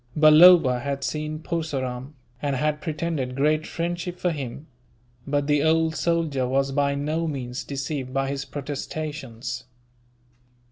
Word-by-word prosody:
Balloba 155 Hz, -3 st, +8 dB
had 140 Hz, +1 st, -3 dB
seen 155 Hz, +1 st, -2 dB
Purseram, 145 Hz, -5 st, -4 dB, 0.3 s
and 140 Hz, -2 st, 0 dB
had 150 Hz, +3 st, 0 dB
pretended 155 Hz, -5 st, -2 dB
great 155 Hz, +3 st, +1 dB
friendship 175 Hz, +1 st, -3 dB
for 180 Hz, 0 st, 0 dB
him; 140 Hz, -1 st, -6 dB, 0.6 s
but 145 Hz, 0 st, +1 dB
the 145 Hz, 0 st, +2 dB
old 160 Hz, 0 st, +2 dB
soldier 155 Hz, -4 st, 0 dB
was 135 Hz, +1 st, +1 dB
by 140 Hz, 0 st, +1 dB
no 155 Hz, +4 st, -1 dB
means 130 Hz, -4 st, -4 dB
deceived 135 Hz, -1 st, -4 dB
by 135 Hz, 0 st, 0 dB
his 140 Hz, -1 st, -3 dB
protestations. 135 Hz, -3 st, -5 dB
145 Hz, 130 wpm, -25 LUFS, 135-155 Hz, 0.6 s, Balloba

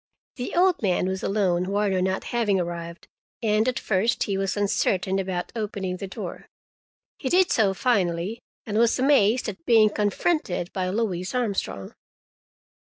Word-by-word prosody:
The 250 Hz, -, -4 dB
old 360 Hz, 0 st, +3 dB
man 185 Hz, -3 st, +1 dB
was 190 Hz, 0 st, -2 dB
alone, 185 Hz, -3 st, +1 dB
Warner 200 Hz, -2 st, +1 dB
not 190 Hz, +1 st, -1 dB
having 215 Hz, -5 st, +2 dB
arrived, 170 Hz, -1 st, -5 dB, 0.4 s
and 215 Hz, +1 st, +2 dB
at 255 Hz, -, 0 dB
first 215 Hz, +3 st, +1 dB
he 200 Hz, -, -2 dB
was 195 Hz, +1 st, -1 dB
uncertain 195 Hz, -1 st, +1 dB
about 185 Hz, -2 st, -3 dB
opening 200 Hz, -4 st, -3 dB
the 195 Hz, -, -6 dB
door. 190 Hz, -, -7 dB, 0.7 s
He 260 Hz, -, -2 dB
did 365 Hz, +3 st, +4 dB
so 200 Hz, -4 st, +2 dB
finally, 190 Hz, -2 st, 0 dB, 0.3 s
and 215 Hz, 0 st, -1 dB
was 235 Hz, 0 st, +3 dB
amazed 255 Hz, -4 st, +3 dB
at 190 Hz, -6 st, -6 dB
being 215 Hz, +1 st, +5 dB
confronted 205 Hz, -, -1 dB
by 185 Hz, -1 st, -1 dB
Louise 190 Hz, -1 st, -2 dB
Armstrong. 200 Hz, -, -2 dB
200 Hz, 150 wpm, -25 LUFS, 185-225 Hz, 0.7 s, being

